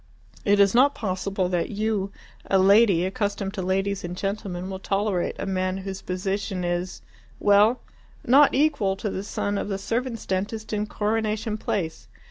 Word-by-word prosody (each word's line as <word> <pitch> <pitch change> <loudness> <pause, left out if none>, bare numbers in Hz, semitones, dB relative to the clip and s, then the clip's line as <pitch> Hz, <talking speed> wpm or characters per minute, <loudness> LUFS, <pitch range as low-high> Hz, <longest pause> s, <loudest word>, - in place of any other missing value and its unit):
It 205 0 +4
is 200 -1 +5
not 270 +4 +5
possible 190 -2 -2
that 175 -2 -1
you, 210 -2 -1 0.4
a 195 - +4
lady, 195 -2 +5
accustomed 200 0 -2
to 200 - -3
ladies 195 +2 -1
and 175 +1 -5
gentlemen, 195 -2 -3
will 190 0 -5
tolerate 195 -2 -1
a - - -4
man 185 -1 -1
whose 195 0 -6
position 190 0 -3
is 175 +1 -3 0.4
well, 210 +4 +4 0.4
not 275 +4 +6
equal 270 -10 +2
to 200 +1 -3
the 190 - -3
son 205 0 -2
of - - -3
the 195 - -1
servants' 230 +3 -3
dentist 210 +4 -3
in 210 0 -1
Coronation 215 +1 -1
Place. 180 -6 -3
200 Hz, 160 wpm, -25 LUFS, 190-215 Hz, 0.4 s, not